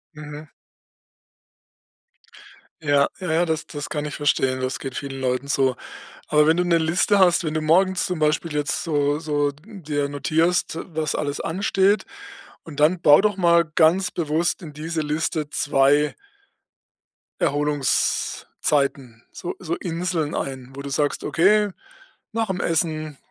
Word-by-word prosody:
Mhm. 150 0 -10 2.3
Ja, 145 -2 +3
ja, 180 -3 -3
ja, 165 +2 +2
das 160 -1 -2
das 145 -1 -6
kann 150 - -3
ich 150 - -5
verstehen, 130 -3 +1
das 130 0 -3
geht 135 -2 -6
vielen 135 -1 -5
Leuten 130 +1 -1
so. 135 -2 +1 0.5
Aber 150 0 +4
wenn 160 +1 +4
du 180 - +1
'ne 170 -1 +3
Liste 170 +5 +2
hast, 180 -2 +4
wenn 155 - -2
du 155 - 0
morgens 180 +4 +2
zum 180 -2 -3
Beispiel 155 +1 0
jetzt 145 -2 -1
so 145 -2 +1
so 145 -2 0
dir 150 -4 -4
notierst, 160 +4 0 0.2
was 155 -1 -1
alles 145 -1 -2
ansteht, 195 +3 +1 0.6
und 150 -3 -8
dann 165 +4 +3
bau 145 -3 +7
doch 210 +1 +1
mal 170 -2 +4
ganz 165 +4 +2
bewusst 170 +2 -1
in 155 -3 -9
diese 160 +2 -3
Liste 155 0 -2
2 145 +1 +2 1.2
Erholungszeiten, 140 -3 0
so 175 - -6
so 170 -2 -3
Inseln 170 -2 -2
ein, 130 -1 -5
wo 140 - -6
du 140 - -6
sagst: 145 +1 -1
„Okay, 205 +4 +3 0.6
nach 225 0 -1
dem 190 -2 -3
Essen 155 -3 -1
155 Hz, 145 wpm, -23 LUFS, 145-170 Hz, 2.3 s, bau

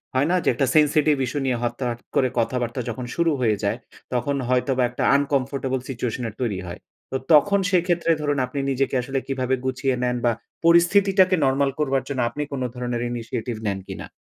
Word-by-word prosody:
হয় 135 +3 +3
না? - - +3
যে - - -5
একটা 135 - 0
sensitive 150 -1 +4
issue 145 +4 -3
নিয়ে 130 -2 +1
হঠাৎ 120 0 -2 0.2
করে 130 - +3
কথাবার্তা 120 +1 -1
যখন 125 +1 -5
শুরু 170 -1 +2
হয়ে 110 -3 +3
যায়, 100 +3 0 0.4
তখন 135 +3 0
হয়তোবা 130 0 +2
একটা 125 - -4
uncomfortable 135 -2 0
সিচুয়েশনের 120 -2 -3
তৈরি 105 -7 -1
হয়। 85 - -7 0.3
তো - - -3 0.2
তখন 200 +7 +5
সেক্ষেত্রে, 175 -2 +2
ধরুন, 145 -1 0
আপনি 130 +3 -5
নিজেকে 135 +1 0
আসলে 135 +2 -2
কীভাবে 130 -1 0
গুছিয়ে 130 0 0
নেন? 125 0 +1
বা 120 - +4 0.3
পরিস্থিতিটাকে 185 +2 +5
নরমাল 135 +1 +2
করবার 135 -3 +1
জন্য 140 -2 -3
আপনি 145 +5 -4
কোন 140 -2 -3
ধরনের 120 -1 -3
initiative 115 -1 -4
নেন 100 -1 -1
কিনা? - - -7
130 Hz, 175 wpm, -23 LUFS, 125-145 Hz, 0.4 s, তখন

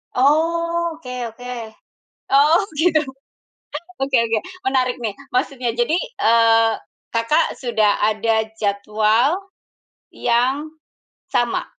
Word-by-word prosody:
Oh, 335 +4 +1
oke 250 -6 -8 0.2
oke. 245 +2 -8 0.8
Oh, 300 +7 +5 0.2
gitu. 320 -3 +3 1.0
Oke 270 0 +1
oke, 225 -1 0 0.3
menarik 255 -1 +1
nih. 225 -4 -3 0.2
Maksudnya, 250 -2 -1
jadi, 240 +7 +1
eee, 230 - +3 0.4
Kakak, 230 +8 +1
sudah 220 -5 +1
ada 220 +1 +1
jadwal 215 - +1 0.7
yang 260 +6 0 0.5
sama 240 -1 0
250 Hz, 90 wpm, -20 LUFS, 225-305 Hz, 1.0 s, Oh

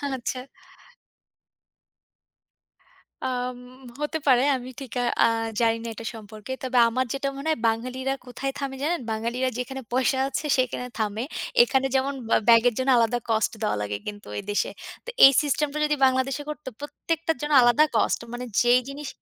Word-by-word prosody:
আচ্ছা। 255 +1 -4 2.9
আম 250 -1 -2 0.4
হতে 300 +2 -1
পারে। 255 -2 +5
আমি 255 0 -6
ঠিক 265 - -8 0.3
আ - - +7 0.3
জানিনা 230 0 +1
এটা 225 - -9
সম্পর্কে। 215 +2 -10
তবে 255 -1 -1
আমার 255 +3 0
যেটা 275 0 -2
মনে 280 +3 -6
হয় 310 - -1
বাঙালিরা 255 +4 -1
কোথায় 255 +2 -4
থামে 275 -1 -4
জানেন? 340 +3 0
বাঙালিরা 235 +4 -1
যেখানে 265 +2 -4
পয়সা 260 +1 +2
আছে 275 +3 -3
সেখানে 255 -1 -1
থামে। 215 0 -2 0.4
এখানে 270 - +2
যেমন 270 +1 +1 0.2
বা - - +4
ব্যাগের 235 +1 +6
জন্য 260 +1 0
আলাদা 235 +1 +2
কস্ট 220 -1 +2
দেওয়া 210 - 0
লাগে 105 0 -3
কিন্তু 205 0 -7
এই - - -4
দেশে। 205 - 0 0.4
তো 485 - -6 0.2
এই 270 - +9
সিস্টেম 295 0 0
টা 300 - -4
যদি 300 0 +1
বাংলাদেশে 260 +2 +1
করতো, 300 -2 -7
প্রত্যেকটার 325 +2 -3
জন্য 295 0 -1
আলাদা 240 +5 +5
কস্ট - - +2
মানে 245 +1 -5 0.2
যেই 245 +1 +5
জিনিস। 280 +1 -7
255 Hz, 160 wpm, -25 LUFS, 230-275 Hz, 2.9 s, এই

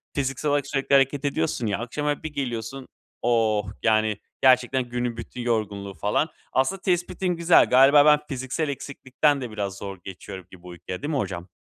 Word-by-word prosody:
fiziksel 135 +1 -1
olarak 145 -1 +1
sürekli 135 0 -1
hareket 135 +1 +2
ediyorsun 145 -5 -1
ya. 100 - -1
Akşam 130 +5 -4
eve 145 -1 -1
bir 155 -1 -5
geliyorsun, 130 -1 -4 0.3
oh! 110 -3 +2 0.2
Yani, 110 -2 +2 0.2
gerçekten 130 0 +4
günün 120 -1 -2
bütün 120 +1 -7
yorgunluğu 105 -4 -2
falan. 105 - 0 0.2
Aslında 135 +9 +1
tespitin 180 0 -1
güzel. 170 +1 +5
Galiba 135 +3 +7
ben, 150 -1 +6
fiziksel 135 +3 -2
eksiklikten 140 +1 -1
de 125 -3 -5
biraz 100 -2 -4
zor 100 -1 -7
geçiyorum 95 -1 -9
gibi 90 -1 -15
uykuya, 90 +1 -7
değil 145 +2 -3
mi 145 - 0
hocam? 90 -6 -4
125 Hz, 170 wpm, -25 LUFS, 105-145 Hz, 0.3 s, Galiba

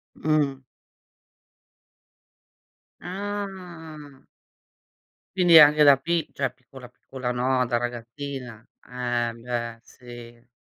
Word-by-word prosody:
Mh. 145 -3 0 2.4
Ah. 180 -7 -7 1.1
Quindi 175 -3 +7
anche 150 0 +7
da 140 -1 +8
pi 165 +3 -1
cioè, 135 -3 -2
piccola, 125 0 -14
piccola 125 0 -7
no, 125 +1 +1
da 120 - 0
ragazzina. 120 0 -6 0.2
Eh 120 -1 -2
beh, 115 -1 -5
si. 120 -1 -14
130 Hz, 85 wpm, -25 LUFS, 120-155 Hz, 2.4 s, da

